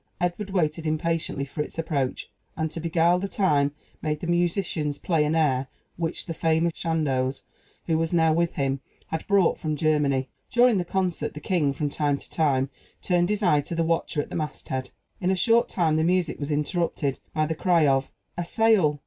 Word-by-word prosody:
Edward 175 +4 -1
waited 165 -4 0
impatiently 155 -2 -1
for 145 +2 -4
its 150 - -6
approach, 150 -5 -2 0.3
and, 160 -1 -1
to - - -5
beguile 170 +2 +2
the 200 - -2
time, 150 -9 +2 0.3
made 150 -1 -1
the - - -5
musicians 170 -3 0
play 160 0 +1
an 150 +2 +1
air 135 -5 +2 0.3
which 165 0 -3
the 165 - -4
famous 165 +1 +1
Chandos, 135 -6 -1 0.4
who 160 -1 +1
was 165 0 0
now 160 -2 +4
with 170 +1 0
him, 135 -1 0 0.3
had 160 - -4
brought 200 -3 +3
from 155 -1 -2
Germany. 145 -3 +1 0.2
During 240 -2 +4
the 175 - -2
concert, 185 -2 -1
the - - -5
king, 155 -3 +1
from 145 +1 -2
time 145 -1 +1
to - - -12
time, 135 -4 +1 0.3
turned 175 -1 +2
his 210 0 -1
eye 150 -6 +4
to 170 - -5
the 165 - +1
watcher 165 -2 0
at - - -13
the - - -4
masthead. 130 -4 -4 0.3
In 180 - 0
a 190 - +3
short 230 +5 +3
time 160 -4 +1
the 160 - +2
music 175 -1 +1
was 145 0 -3
interrupted 150 -2 -1 0.2
by 155 0 +2
the 160 - -1
cry 170 -1 +3
of 135 -1 +2 0.3
"A - - 0
sail!" 185 -6 +3
160 Hz, 195 wpm, -25 LUFS, 150-175 Hz, 0.4 s, now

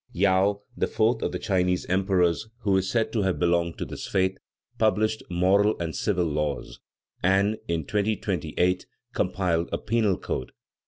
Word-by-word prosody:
Yao, 100 +2 +2
the - - 0
fourth 110 +3 +1
of - - -1
the - - -2
Chinese 90 -2 0
emperors, 95 +1 +1
who 100 -3 +2
is 95 0 +1
said 115 -2 0
to 110 - +1
have 95 -2 0
belonged 85 -1 +1
to - - -3
this - - -7
faith, 95 -1 +1 0.4
published 110 0 +2
moral 95 +4 +3
and 85 -2 -3
civil 90 -4 0
laws, 75 -2 -3 0.4
and, 100 +4 +2
in 85 -3 -1
2228, 90 -4 0 0.3
compiled 85 -3 0
a - - 0
penal 110 -4 +1
code. 65 - -4
95 Hz, 155 wpm, -26 LUFS, 85-105 Hz, 0.4 s, moral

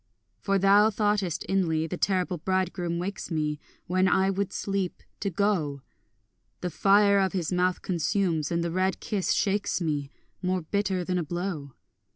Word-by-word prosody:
For 195 - +1
thou 200 +2 +5
thoughtest 205 -5 0
inly, 165 -5 +1
the 165 - -4
terrible 185 -1 0
bridegroom 180 -1 -1
wakes 190 +3 -4
me, 150 -3 -1 0.3
When 185 +1 +2
I 190 +1 +3
would 195 0 -2
sleep, 195 -2 -3 0.2
to 200 - -1
go; 170 -8 0 0.8
The 180 - -2
fire 200 +3 +4
of 190 -1 +1
his 180 -2 -1
mouth 180 0 +1
consumes, 170 -3 0
and 170 0 0
the 170 - -2
red 185 +2 0
kiss 200 -4 -1
shakes 200 -1 +1
me, 150 -5 -2 0.3
More 185 -1 0
bitter 190 +1 -1
than 180 0 0
a - - -1
blow. 165 -4 -4
185 Hz, 160 wpm, -27 LUFS, 170-195 Hz, 0.8 s, thou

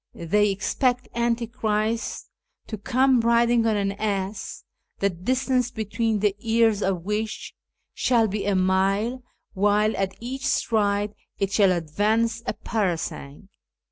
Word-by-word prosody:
They 205 +5 +2
expect 245 +6 0
Antichrist 230 -2 -1 0.3
to 220 - -5
come 255 +3 +3
riding 235 0 +3
on 215 -2 +2
an 200 -1 0
ass, 200 -1 -3 0.3
the 200 0 +1
distance 250 +7 0
between 220 -2 -1
the 205 -2 +2
ears 225 -1 +2
of 190 -4 -1
which 210 +2 -3 0.4
shall 235 -3 +2
be 205 0 -3
a 200 - +2
mile, 195 +6 +1 0.3
while 210 +2 +2
at 190 -1 -2
each 260 +3 -4
stride 205 -2 +1 0.2
it 195 -1 -1
shall 200 -2 +4
advance 210 +7 0
a - - 0
parasang. 190 -6 -3
215 Hz, 125 wpm, -24 LUFS, 195-230 Hz, 0.4 s, shall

